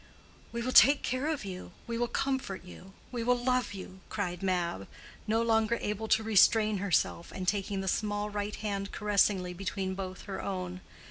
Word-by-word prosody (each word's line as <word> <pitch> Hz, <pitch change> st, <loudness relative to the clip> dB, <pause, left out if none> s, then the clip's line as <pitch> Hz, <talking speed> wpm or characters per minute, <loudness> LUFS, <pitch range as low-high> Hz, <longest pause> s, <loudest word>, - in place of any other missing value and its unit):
"We 235 Hz, 0 st, -3 dB
will 255 Hz, -, -1 dB
take 280 Hz, +2 st, +7 dB
care 255 Hz, +3 st, -1 dB
of 310 Hz, -9 st, -2 dB
you—we 190 Hz, +4 st, -7 dB
will 240 Hz, -, +1 dB
comfort 265 Hz, -8 st, -2 dB
you—we 195 Hz, +6 st, -8 dB
will 250 Hz, +1 st, +3 dB
love 250 Hz, -3 st, 0 dB
you," 190 Hz, 0 st, -9 dB
cried 180 Hz, -5 st, -3 dB
Mab, 175 Hz, -, -1 dB, 0.4 s
no 225 Hz, +2 st, +2 dB
longer 225 Hz, 0 st, +2 dB
able 210 Hz, +1 st, -3 dB
to 220 Hz, 0 st, +3 dB
restrain 215 Hz, 0 st, +5 dB
herself, 185 Hz, -3 st, 0 dB
and 185 Hz, -1 st, -5 dB
taking 200 Hz, 0 st, 0 dB
the 190 Hz, -, -5 dB
small 205 Hz, +1 st, -1 dB
right 205 Hz, 0 st, -3 dB
hand 200 Hz, -2 st, -3 dB
caressingly 200 Hz, -3 st, +2 dB
between 190 Hz, +1 st, -3 dB
both 185 Hz, -1 st, -6 dB
her 195 Hz, -2 st, -5 dB
own. 185 Hz, -1 st, -4 dB
205 Hz, 170 wpm, -30 LUFS, 190-225 Hz, 0.4 s, take